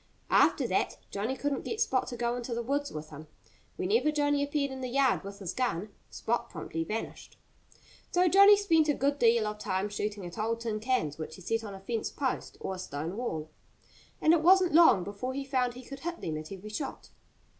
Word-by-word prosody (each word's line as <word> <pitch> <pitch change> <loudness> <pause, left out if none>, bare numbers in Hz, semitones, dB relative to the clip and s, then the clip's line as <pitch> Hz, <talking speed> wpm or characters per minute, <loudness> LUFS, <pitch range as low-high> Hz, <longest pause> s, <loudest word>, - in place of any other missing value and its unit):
After - - +4
that - - 0
Johnnie 215 +6 -2
couldn't 285 -2 -2
get 450 - -4
Spot 260 - +1
to 240 - -5
go 240 0 0
into 240 -1 -4
the 235 - -2
woods 285 +3 -1
with 155 0 -7
him. 155 +1 -10 0.5
Whenever 230 +11 +2
Johnnie 290 -1 +1
appeared 285 -1 -1
in 265 0 -6
the 255 - -3
yard 265 -2 +2
with 200 +1 -8
his 190 -4 -5
gun, 215 -6 -1 0.2
Spot 235 +2 -2
promptly 165 -1 -4
vanished. 215 +7 -6 0.7
So 360 +1 +3
Johnnie 400 +3 +8
spent 325 -6 +3
a 295 - +3
good 280 +1 0
deal 230 -1 +4
of 210 0 -4
time 195 0 -1
shooting 205 -1 -3
at 175 +5 -8
old 230 +2 -1
tin 220 -2 -2
cans 210 - -1
which 155 0 -6
he - - -13
set 225 +4 -1
on 205 -2 -7
a - - -9
fence 220 +3 -3
post 265 -3 -3
or 190 - -4
a 185 - -7
stone 160 +1 -5
wall. 160 -10 -4 0.7
And 315 - +5
it 335 - +3
wasn't 365 0 +5
long 305 - +7
before 205 +7 -5
he 275 0 -3
found 255 -3 0
he 255 - -9
could 275 +1 -8
hit 340 +3 -4
them 160 - -3
at 155 +2 -7
every 195 +2 -8
shot. 275 +6 -5
235 Hz, 215 wpm, -30 LUFS, 200-280 Hz, 0.7 s, Johnnie